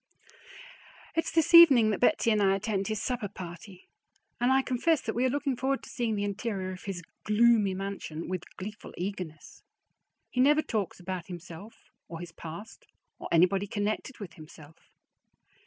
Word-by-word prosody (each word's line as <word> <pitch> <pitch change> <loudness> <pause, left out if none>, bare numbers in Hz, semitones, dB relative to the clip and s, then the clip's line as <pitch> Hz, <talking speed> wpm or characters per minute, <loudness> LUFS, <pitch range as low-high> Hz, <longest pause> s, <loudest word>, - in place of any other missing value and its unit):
It's 330 - 0
this 325 0 +1
evening 270 -10 +9
that 205 - -2
Betsy 245 -3 +3
and 210 -1 +2
I 195 -1 +4
attend 195 -1 -2
his 215 -1 -2
supper 245 -2 -2
party, 185 0 -10 0.5
and 245 +2 +3
I 265 0 +4
confess 260 +6 +1
that 220 - -3
we 245 +2 +1
are - - +3
looking 280 0 -1
forward 265 +2 -1
to - - -11
seeing 235 -3 -1
the 205 - -1
interior 200 -2 -3
of 185 - -10
his 190 -3 -5 0.2
gloomy 210 -2 +4
mansion 195 -5 -5
with 185 -1 -6
gleeful 210 +3 -8
eagerness. 180 -4 -6 0.7
He 250 - +1
never 295 +3 +5
talks 205 -6 -3
about 180 -1 -5
himself 180 +3 -9 0.3
or 165 - -7
his 175 0 -8
past 205 - -10 0.3
or - - -6
anybody 185 +4 +3
connected 215 +5 -3
with 190 -6 -8
himself. 155 -1 -15
205 Hz, 165 wpm, -29 LUFS, 185-240 Hz, 0.7 s, evening